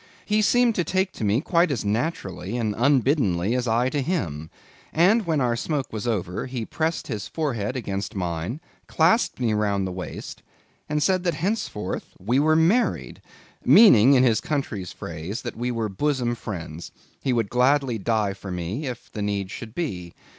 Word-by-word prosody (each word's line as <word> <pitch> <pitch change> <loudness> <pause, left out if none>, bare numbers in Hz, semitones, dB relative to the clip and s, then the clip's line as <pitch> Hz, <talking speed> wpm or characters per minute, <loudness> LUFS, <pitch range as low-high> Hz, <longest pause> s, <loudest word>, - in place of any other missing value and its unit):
He 215 0 +2
seemed 245 +2 +4
to 180 - 0
take 190 +2 0
to - - -7
me 105 +5 +2
quite 170 +1 +2
as 125 -7 -2
naturally 105 - -2
and 110 -3 -1
unbiddenly 120 - +2
as 125 -1 -1
I 115 +3 +2
to 145 +1 -1
him; 80 - -2 0.4
and 190 +5 +3
when 160 -3 +1
our 120 -3 +1
smoke 140 +2 -3
was 110 +2 -4
over, 95 -4 -2
he 125 -3 -4
pressed 160 +6 -2
his 105 -1 -4
forehead 130 -8 -2
against 100 -3 -4
mine, 90 - -3 0.3
clasped 170 - +2
me 115 -3 +1
round 100 -2 0
the 95 - -3
waist, 90 0 -7 0.5
and 150 0 +1
said 185 -2 +2
that 170 -3 +1
henceforth 165 - -3
we 120 +8 +1
were 155 +2 +4
married; 180 +10 +1 0.4
meaning, 140 - +7
in 130 - +5
his 115 -4 +3
country's 110 - -3
phrase, 85 +8 -6
that 120 - -5
we 120 +2 -2
were 115 -3 -1
bosom 125 +3 0
friends; 85 -8 -7 0.3
he 135 - 0
would 115 -4 0
gladly 125 -1 +2
die 105 -1 0
for 95 0 -9
me, 90 - -3
if 120 -2 -8
need 100 -2 -2
should 115 0 -8
be. 90 - -4
120 Hz, 175 wpm, -24 LUFS, 100-150 Hz, 0.5 s, meaning